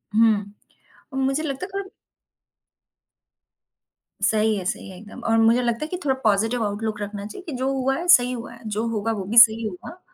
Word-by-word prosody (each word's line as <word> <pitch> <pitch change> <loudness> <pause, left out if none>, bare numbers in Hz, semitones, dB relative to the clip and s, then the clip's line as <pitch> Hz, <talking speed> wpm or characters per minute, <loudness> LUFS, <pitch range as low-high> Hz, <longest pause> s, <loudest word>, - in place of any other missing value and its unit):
हुँ। 215 -2 +3 0.7
मुझे 270 +4 0
लगता 280 +2 -4
काब 395 0 -6 2.3
सही 220 0 +2
है, 190 - -4
सही 190 - -4
है 185 - -11
एकदम। 210 +5 -12
और 225 - +3
मुझे 230 +2 +4
लगता 235 +2 -1
है - - -7
कि 360 - -4
थोड़ा 265 -2 +2
पॉज़िटिव 225 +3 +1
आउटलुक 210 +1 -3
रखना 205 0 -5
चाहिए 290 - -9
कि 320 - -6
जो 260 +1 -1
हुआ 270 0 0
है 340 +3 -4
सही 250 -8 +6
हुआ 235 -1 -6
है, 235 - -14
जो 215 +2 -2
होगा 225 -1 -1
वो 210 -3 -3
भी 220 +5 -2
सही 230 0 +6
होगा। 215 - -9
225 Hz, 190 wpm, -23 LUFS, 210-265 Hz, 2.3 s, सही